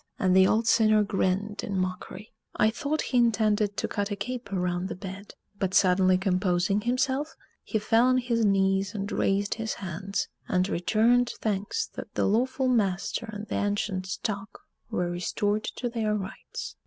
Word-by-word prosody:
and 185 -1 +2
the 190 0 +7
old 225 +1 +2
sinner 215 -2 +5
grinned 200 +1 -1
in 195 - -3
mockery. 185 +3 -4 0.2
I 215 - +3
thought 290 +6 -2
he 255 - -1
intended 215 -3 +2
to - - -1
cut 205 0 -2
a 205 - -2
caper 205 -1 -4
round 180 +1 -1
the - - -4
bed; 195 +1 -9 0.2
but 190 -1 -1
suddenly 185 0 +4
composing 185 +1 +1
himself, 260 +5 0 0.3
he 220 - -2
fell 225 +3 +3
on 255 0 +4
his 240 -2 0
knees 195 0 +2
and 200 +1 -3
raised 200 +1 +1
his 225 -1 -3
hands, 195 +1 -3 0.2
and 185 0 +1
returned 230 +7 +2
thanks 210 - -1
that - - -9
the - - +1
lawful 255 +5 +1
master 215 -1 0
and 210 0 -6
the - - -6
ancient 205 -2 -1
stock 200 +1 -4 0.3
were 175 -1 -1
restored 205 +4 -1
to 245 - -4
their 225 -3 -1
rights. 195 -2 -6
205 Hz, 165 wpm, -27 LUFS, 190-225 Hz, 0.3 s, the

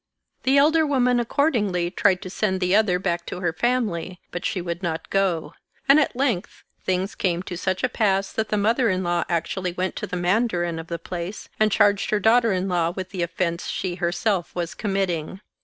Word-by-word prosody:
The 265 +2 +3
elder 315 +3 +5
woman 250 -4 +2
accordingly 210 - +1
tried 185 -1 +2
to 185 - -6
send 190 -2 0
the 180 +1 +2
other 210 -4 +3
back 175 -2 -1
to 180 - -5
her 175 -3 -1
family, 185 -5 -1
but 175 - -5
she - - -1
would 170 0 -4
not 165 -3 -4
go; 190 -4 0 0.3
and 275 +2 +7
at 290 - +1
length 245 -8 -1 0.2
things 185 +2 -1
came 175 -2 -1
to 180 - -6
such 185 +1 -2
a - - +4
pass 195 -5 +1
that 220 -1 -1
the 210 - +1
mother 225 +4 +2
in 185 -1 0
law 175 0 0
actually 175 +2 -1
went 185 +1 -2
to - - -3
the 180 - -4
mandarin 175 -3 0
of 165 - -8
the 170 - -3
place 175 +3 -6
and 215 0 +3
charged 205 0 +3
her 210 - +2
daughter 230 +2 +4
in 185 0 0
law 175 -3 +1
with 185 +1 -6
the 185 -3 -3
offense 170 0 -2
she 185 -2 -2
herself 180 +1 -1
was 170 -2 -3
committing. 190 -5 -2
185 Hz, 205 wpm, -24 LUFS, 175-215 Hz, 0.3 s, and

